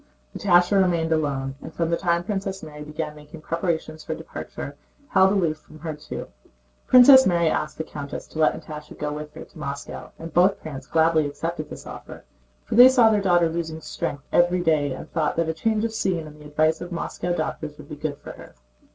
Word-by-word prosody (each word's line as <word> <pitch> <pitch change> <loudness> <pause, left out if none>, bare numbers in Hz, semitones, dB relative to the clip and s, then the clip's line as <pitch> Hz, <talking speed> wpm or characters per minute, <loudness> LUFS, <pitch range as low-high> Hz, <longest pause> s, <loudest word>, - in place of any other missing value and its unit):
Natásha 180 +1 +4
remained 170 -3 +1
alone 140 -4 0
and, - - -8
from 165 -1 0
the - - +3
time 170 -1 0
Princess 195 0 -3
Mary 150 -1 -9
began 150 0 -5
making 150 +2 -12
preparations 160 -2 -2
for - - -4
departure, - - -7 0.3
held 190 0 +5
aloof 170 -6 +1
from 155 - -16
her 160 0 -5
too. 150 0 -7 0.6
Princess 260 +1 +9
Mary 170 -3 +3
asked 155 0 -2
the 160 - -2
countess 145 -2 -7
to 160 - -9
let 155 - +3
Natásha 150 -1 -10
go 150 0 -3
with 150 0 -7
her 160 - -8
to - - -16
Moscow, 140 -1 -6
and 165 -1 -8
both 185 +3 +4
parents 135 -4 -7
gladly 160 -2 +3
accepted 155 +2 -4
this - - -9
offer, - - -10 0.4
for - - -5
they 245 +3 +10
saw 245 -4 +5
their 210 -2 +2
daughter 175 -3 +4
losing 160 -1 -4
strength 145 -2 -4
every 175 +1 +3
day 155 -4 +2
and 130 - -6
thought 160 -3 0
that 165 -1 0
a - - 0
change 220 +5 0
of 225 - -3
scene 185 -7 -1
and 150 0 -13
the - - -13
advice 155 +2 +1
of 175 - -7
Moscow 175 +1 -3
doctors 155 -2 -4
would 150 -2 -12
be 150 - -6
good 145 -1 -4
for - - -10
her. - - -13
160 Hz, 210 wpm, -24 LUFS, 150-175 Hz, 0.6 s, they